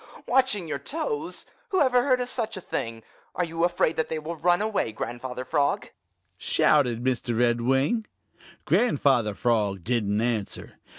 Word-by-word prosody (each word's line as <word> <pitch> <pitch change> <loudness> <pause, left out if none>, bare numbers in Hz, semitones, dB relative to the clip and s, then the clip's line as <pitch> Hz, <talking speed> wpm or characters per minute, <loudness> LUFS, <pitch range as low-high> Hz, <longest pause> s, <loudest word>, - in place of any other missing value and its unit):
Ho, - - -20
ho, - - -18
ho! - - -15
Watching 250 -8 +3
your 145 -2 -3
toes! 330 - -3 0.2
Who 380 -2 +1
ever 255 -3 +4
heard 255 -1 +2
of 250 - -2
such 225 -4 -2
a - - -4
thing? 115 -8 -4 0.3
Are 180 - +1
you 165 0 -2
afraid 175 -2 +1
that 160 - +1
they 160 - -2
will 155 +2 -5
run 175 +3 +2
away, 210 - 0
Grandfather 125 +3 -5
Frog?" 145 -1 0 0.5
shouted 125 -6 +3
Mr. 125 -2 -1
Redwing. 130 - +2 0.6
Grandfather 135 - +2
Frog 105 -4 0
didn't 105 -3 0
answer. 115 -3 -3
145 Hz, 165 wpm, -26 LUFS, -, 0.6 s, ever